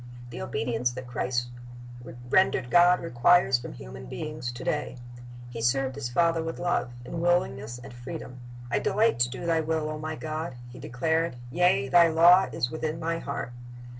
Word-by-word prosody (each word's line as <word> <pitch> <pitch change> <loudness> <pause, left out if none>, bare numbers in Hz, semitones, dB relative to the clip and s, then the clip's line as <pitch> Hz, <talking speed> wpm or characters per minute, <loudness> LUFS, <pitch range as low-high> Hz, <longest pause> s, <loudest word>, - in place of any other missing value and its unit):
The 120 - -7
obedience 125 -4 -1
that 130 +1 -7
Christ 120 0 -2 0.8
rendered 125 -5 +2
God 175 +1 +6
requires 165 -2 +3
from 120 - -8
human 65 +1 -10
beings 150 - -5
to 120 - -8
day. 150 -3 -2 0.5
He 115 -1 -6
served 130 +3 +1
His 135 -3 -5
Father 165 +5 +2
with 165 0 -4
love, 175 -8 0 0.2
in 165 +6 -5
willingness 130 -9 0
and 125 +1 -11
freedom. 125 +1 -8 0.3
"I - - +2
delight 215 - +2
to 120 0 +3
do 130 +7 -7
Thy 165 -1 +2
will, 155 -1 -1
O 155 - -5
My 155 +1 -4
God," 155 -3 -5 0.2
He - - -11
declared; 160 +5 -1 0.2
"yea. 180 -5 +3
Thy 170 +5 +6
law 170 +3 +6
is 125 - -2
within 160 0 -3
My 165 0 -2
heart." 130 -5 -5
150 Hz, 170 wpm, -27 LUFS, 120-165 Hz, 0.8 s, God